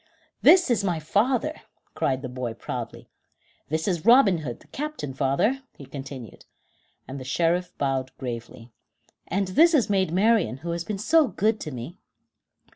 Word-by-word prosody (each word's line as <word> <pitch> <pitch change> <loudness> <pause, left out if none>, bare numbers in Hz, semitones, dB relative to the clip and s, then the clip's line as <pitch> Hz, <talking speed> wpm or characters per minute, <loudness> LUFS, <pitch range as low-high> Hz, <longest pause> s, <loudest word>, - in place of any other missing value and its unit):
"This 360 -7 +6
is 220 -4 +2
my 175 -4 0
father," 245 - 0 0.3
cried 130 0 -1
the - - -3
boy 125 -2 -5
proudly. - - -6 0.6
"This 160 +3 -1
is 175 -5 -1
Robin 225 -6 +6
Hood, 130 -6 -6
the - - -19
captain, 295 - -5
father," 140 - +1 0.2
he 140 - -10
continued, 135 -5 -9 0.6
and 135 +1 -6
the - - -7
Sheriff 170 +6 0
bowed 135 -2 -1
gravely; 115 -2 -7 0.6
"and 195 +1 -1
this 325 - +5
is 245 -7 +2
Maid 190 -4 +1
Marian, 200 - +2
who 170 - -2
has 170 0 -2
been 210 +3 -4
so 310 +9 +4
good 215 0 0
to - - -5
me." 130 +7 -8
170 Hz, 160 wpm, -25 LUFS, 135-220 Hz, 0.6 s, This